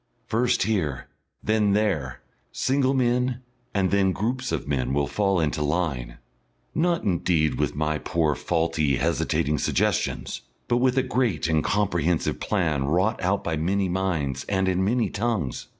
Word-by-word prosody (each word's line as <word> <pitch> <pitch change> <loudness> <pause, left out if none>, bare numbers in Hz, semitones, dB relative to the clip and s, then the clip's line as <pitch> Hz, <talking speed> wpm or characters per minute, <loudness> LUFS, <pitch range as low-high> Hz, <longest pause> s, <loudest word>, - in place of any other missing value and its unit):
First 120 0 +1
here, 90 -11 -1 0.4
then 105 -2 +2
there, 80 - 0 0.3
single 135 0 +1
men 125 0 +1 0.3
and 95 -2 +1
then 95 -2 +3
groups 125 +5 -2
of - - -2
men 65 -2 0
will 70 0 +2
fall 100 +2 +1
into 75 -2 0
line 75 -6 -1 0.6
not 170 0 +1
indeed 85 -4 +1
with - - 0
my 75 0 0
poor 80 -2 +1
faulty 80 -2 0
hesitating 75 0 0
suggestions - - 0 0.3
but 120 - +2
with 130 +1 +2
a 130 - +4
great 125 -8 0
and 80 -2 +2
comprehensive 90 -5 0
plan 80 -9 0
wrought 90 +9 +1
out 95 +2 0
by 80 -2 -1
many 95 +4 0
minds 85 -8 -1
and 95 -1 +1
in 95 0 +1
many 115 +4 +1
tongues. 105 - -2
95 Hz, 150 wpm, -25 LUFS, 75-110 Hz, 0.6 s, a